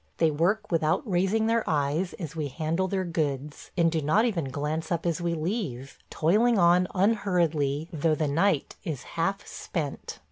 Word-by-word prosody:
They 165 -2 +3
work 190 +8 0
without 160 - +1
raising 195 +4 +1
their 230 0 +2
eyes 150 +4 0
as 165 -4 -7
we 155 -2 -2
handle 160 +6 -1
their 190 0 -1
goods, 150 -4 -3
and 165 -1 +3
do 160 -1 0
not 175 +11 +3
even 185 - -1
glance 150 +5 -3
up 170 0 -1
as 170 0 0
we 170 -1 0
leave, 155 - -4
toiling 215 +9 +3
on 175 0 +4
unhurriedly, 170 -8 +1
though 155 0 +1
the 155 -1 0
night 160 +1 +1
is 150 -6 -4
half 195 +4 -1
spent. 150 -6 -5
165 Hz, 170 wpm, -27 LUFS, 150-190 Hz, -, on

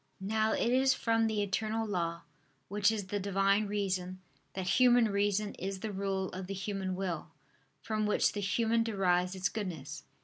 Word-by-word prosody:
Now 215 +3 +1
it 235 - +1
is 265 +1 +4
from 225 -1 +2
the 215 -2 0
eternal 220 +3 -1
law, 170 -4 -2 0.5
which 205 +2 +3
is 210 -3 -3
the 205 +2 -2
Divine 195 +1 +2
Reason, 190 -3 -2 0.4
that 190 -1 -3
human 245 -3 +6
reason 205 +1 0
is 190 0 -4
the 220 - -3
rule 195 -1 -2
of 185 0 -6
the 195 - -4
human 195 -1 -3
will, 180 -4 -3 0.6
from 215 -1 -1
which 210 - +3
the 205 - -4
human 225 +4 +1
derives 185 -4 +1
its 190 +1 0
goodness. 160 -10 -5
200 Hz, 170 wpm, -32 LUFS, 190-215 Hz, 0.6 s, human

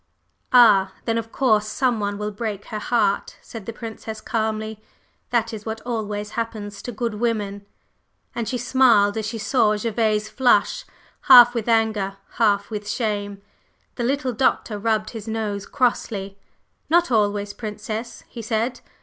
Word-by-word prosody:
"Ah 205 -6 +6
then, 230 -1 +1
of 225 0 -7
course 215 -5 +2
some 245 +1 0
one 205 -1 -2
will 210 0 -3
break 205 -1 -4
her 215 - -5
heart!" 210 -3 0
said 225 -4 -10
the - - -3
Princess 220 -1 -7
calmly. 220 -1 -3 0.5
"That 230 -1 0
is 215 -1 -6
what 220 0 -4
always 210 -3 -4
happens 210 -3 -5
to 245 - -6
good 235 0 -3
women." 205 -4 -2 0.7
And 235 -2 -3
she 255 - -1
smiled 240 -5 +4
as 220 -1 -2
she 225 +1 -4
saw 215 -1 +2
Gervase 215 -1 0
flush, 250 - +2 0.4
half 245 -2 +10
with 235 -1 -2
anger, 215 -4 +1 0.2
half 205 -2 +2
with 210 -1 -5
shame. 205 -3 -2 0.5
The 240 - -4
little 265 0 0
Doctor 220 -3 0
rubbed 215 0 0
his 225 -2 -8
nose 215 -3 -3
crossly. 200 -6 -1 0.5
"Not 345 -1 +3
always, 205 -2 +1
Princess," 215 +1 -6
he 235 - -8
said. 230 +3 -1
220 Hz, 150 wpm, -22 LUFS, 205-235 Hz, 0.7 s, half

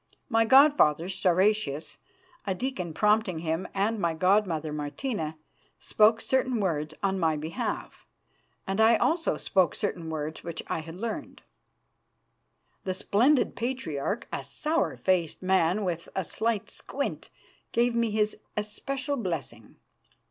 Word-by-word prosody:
My 225 -2 +3
god 280 +5 +7
father, 155 - +3
Stauracius, 185 -4 +1 0.5
a 190 - 0
deacon 190 -7 -3
prompting 210 +1 +2
him, 160 +2 -2
and 210 +3 0
my 170 -3 0
god 195 +5 +3
mother, 155 -3 -3
Martina, 155 - -3 0.4
spoke 220 +1 +4
certain 260 -2 +1
words 155 -6 -1
on 190 -1 +1
my 160 -3 +2
behalf, 160 +2 -4 0.6
and 195 +3 0
I 225 +1 +6
also 330 +8 +1
spoke 185 -3 +2
certain 175 -6 -3
words 155 0 -4
which 170 -2 -5
I - - -2
had 165 +1 -8
learned. 220 +4 -5 1.4
The 185 -1 -2
splendid 245 +9 +2
Patriarch, 230 - -3
a - - -2
sour 315 +2 -1
faced 180 -2 0
man 190 +2 +2
with 170 -2 -3
a 190 - -1
slight 225 +1 -2
squint, - - -4 0.4
gave 240 +1 +2
me 235 -1 +1
his 210 0 0 0.2
especial 270 +7 -2
blessing. 155 - -5
195 Hz, 135 wpm, -28 LUFS, 165-225 Hz, 1.4 s, god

